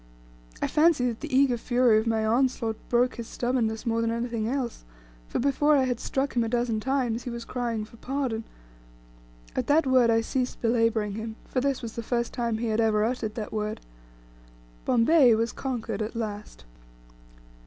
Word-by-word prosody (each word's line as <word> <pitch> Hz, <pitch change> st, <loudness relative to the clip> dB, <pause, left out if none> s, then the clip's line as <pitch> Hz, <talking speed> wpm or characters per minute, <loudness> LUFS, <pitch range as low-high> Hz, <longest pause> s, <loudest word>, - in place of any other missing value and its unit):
I -, -, +2 dB
fancy 305 Hz, -4 st, +3 dB
that 230 Hz, -, -5 dB
the -, -, -7 dB
eager 260 Hz, -2 st, +4 dB
fury 240 Hz, -2 st, +3 dB
of 220 Hz, -, -3 dB
my 220 Hz, -1 st, +1 dB
onslaught 230 Hz, -1 st, +1 dB
broke 245 Hz, +1 st, +2 dB
his 235 Hz, -1 st, -6 dB
stubbornness 240 Hz, -2 st, -1 dB
more 230 Hz, -1 st, +1 dB
than 230 Hz, -, 0 dB
anything 230 Hz, -1 st, -2 dB
else; 250 Hz, -1 st, -3 dB, 0.4 s
for -, -, -3 dB
before 290 Hz, +3 st, +3 dB
I 270 Hz, -, +3 dB
had 250 Hz, -2 st, -1 dB
struck 270 Hz, 0 st, -2 dB
him 240 Hz, -, +3 dB
a 225 Hz, -, -2 dB
dozen 235 Hz, -2 st, 0 dB
times 250 Hz, -1 st, 0 dB
he -, -, -3 dB
was 235 Hz, -1 st, -6 dB
crying 235 Hz, -4 st, -3 dB
for 230 Hz, +2 st, -17 dB
"pardon." 255 Hz, -3 st, -2 dB, 1.1 s
At -, -, -1 dB
that 295 Hz, +2 st, +4 dB
word 255 Hz, -3 st, +4 dB
I 225 Hz, 0 st, +4 dB
ceased 250 Hz, +2 st, -2 dB
belaboring 230 Hz, -2 st, +1 dB
him, 220 Hz, +2 st, -5 dB
for 255 Hz, -, -1 dB
this 275 Hz, -1 st, -1 dB
was 225 Hz, -, -5 dB
the 235 Hz, -, -4 dB
first 235 Hz, +1 st, -2 dB
time 235 Hz, -3 st, -1 dB
he 230 Hz, 0 st, -2 dB
had 220 Hz, +1 st, +1 dB
ever 215 Hz, -1 st, +2 dB
uttered 225 Hz, -2 st, -2 dB
that 215 Hz, -3 st, -5 dB
word. 215 Hz, 0 st, -2 dB, 1.1 s
Bombay 250 Hz, 0 st, +5 dB
was 230 Hz, +1 st, 0 dB
conquered 240 Hz, -5 st, -4 dB
at 215 Hz, +2 st, -4 dB
last. 205 Hz, -, -6 dB
235 Hz, 185 wpm, -27 LUFS, 225-255 Hz, 1.1 s, Bombay